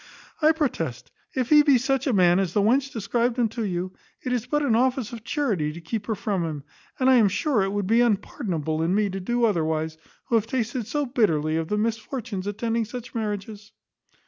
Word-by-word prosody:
I 310 Hz, +1 st, +6 dB
protest, 240 Hz, -, -2 dB, 0.2 s
if 255 Hz, -3 st, -1 dB
he 300 Hz, -1 st, +8 dB
be 285 Hz, -3 st, +5 dB
such 270 Hz, +2 st, 0 dB
a -, -, +3 dB
man 180 Hz, -4 st, +4 dB
as 185 Hz, -3 st, -1 dB
the 205 Hz, -, +3 dB
wench 265 Hz, +5 st, +2 dB
described 235 Hz, +3 st, -1 dB
him 240 Hz, -2 st, +3 dB
to 230 Hz, +1 st, -4 dB
you, 185 Hz, -2 st, -3 dB, 0.3 s
it 255 Hz, -, -1 dB
is 245 Hz, -1 st, -2 dB
but 295 Hz, +3 st, 0 dB
an 240 Hz, -6 st, +2 dB
office 250 Hz, -1 st, +1 dB
of 230 Hz, -2 st, -8 dB
charity 215 Hz, -, -1 dB
to 170 Hz, -, -8 dB
keep 205 Hz, +5 st, -5 dB
her 220 Hz, -, 0 dB
from 200 Hz, -3 st, -1 dB
him; 155 Hz, -4 st, -4 dB, 0.4 s
and 260 Hz, -, +2 dB
I 260 Hz, -1 st, +7 dB
am 220 Hz, -3 st, +5 dB
sure 260 Hz, -, +1 dB
it 195 Hz, 0 st, 0 dB
would 205 Hz, -1 st, -1 dB
be 225 Hz, +5 st, +4 dB
unpardonable 190 Hz, -, -1 dB
in 170 Hz, +4 st, +1 dB
me 205 Hz, -1 st, +1 dB
to 195 Hz, -, -4 dB
do 240 Hz, +5 st, +1 dB
otherwise, 160 Hz, -5 st, -1 dB, 0.3 s
who -, -, -6 dB
have 225 Hz, -1 st, +3 dB
tasted 240 Hz, -2 st, -2 dB
so 290 Hz, +4 st, -1 dB
bitterly 165 Hz, -, +1 dB
of 165 Hz, 0 st, -1 dB
the 210 Hz, -, -1 dB
misfortunes 220 Hz, -2 st, -3 dB
attending 225 Hz, +2 st, -1 dB
such 240 Hz, +2 st, -8 dB
marriages." 210 Hz, -1 st, -5 dB
220 Hz, 215 wpm, -25 LUFS, 190-250 Hz, 0.4 s, he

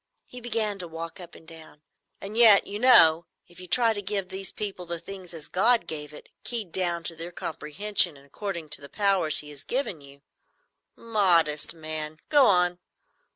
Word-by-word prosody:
He 250 Hz, -, -11 dB
began 220 Hz, -4 st, -2 dB
to 180 Hz, -, -5 dB
walk 165 Hz, +1 st, -7 dB
up 175 Hz, -1 st, -12 dB
and 160 Hz, -, -16 dB
down. 160 Hz, -2 st, -14 dB, 0.4 s
"And 200 Hz, +2 st, -8 dB
yet, 225 Hz, -4 st, +7 dB
you 205 Hz, +1 st, -6 dB
know, 170 Hz, -10 st, +6 dB, 0.2 s
if 175 Hz, -, -16 dB
you 180 Hz, -, -9 dB
try 230 Hz, +2 st, +3 dB
to 205 Hz, -, -5 dB
give 195 Hz, -1 st, -3 dB
these 190 Hz, 0 st, -5 dB
people 195 Hz, -4 st, -5 dB
the 170 Hz, 0 st, -3 dB
thing 185 Hz, +2 st, -10 dB
as 160 Hz, -2 st, -7 dB
God 225 Hz, +2 st, +3 dB
gave 150 Hz, -3 st, -7 dB
it, 150 Hz, -, -13 dB
keyed 225 Hz, -7 st, -5 dB
down 175 Hz, -2 st, -2 dB
to 165 Hz, -, -4 dB
their 165 Hz, +2 st, -8 dB
comprehension 175 Hz, +1 st, 0 dB
and 140 Hz, -, -18 dB
according 170 Hz, +1 st, -6 dB
to 150 Hz, -, -3 dB
the 140 Hz, -, -11 dB
powers 195 Hz, -6 st, +1 dB
He 150 Hz, 0 st, -12 dB
has 145 Hz, -1 st, -10 dB
given 245 Hz, -, -3 dB
you——" 140 Hz, 0 st, -16 dB, 0.7 s
"Modest 175 Hz, -10 st, +1 dB
man! 155 Hz, -1 st, -6 dB
Go 290 Hz, -3 st, +6 dB
on." 180 Hz, -2 st, +3 dB
180 Hz, 190 wpm, -26 LUFS, 160-205 Hz, 0.7 s, yet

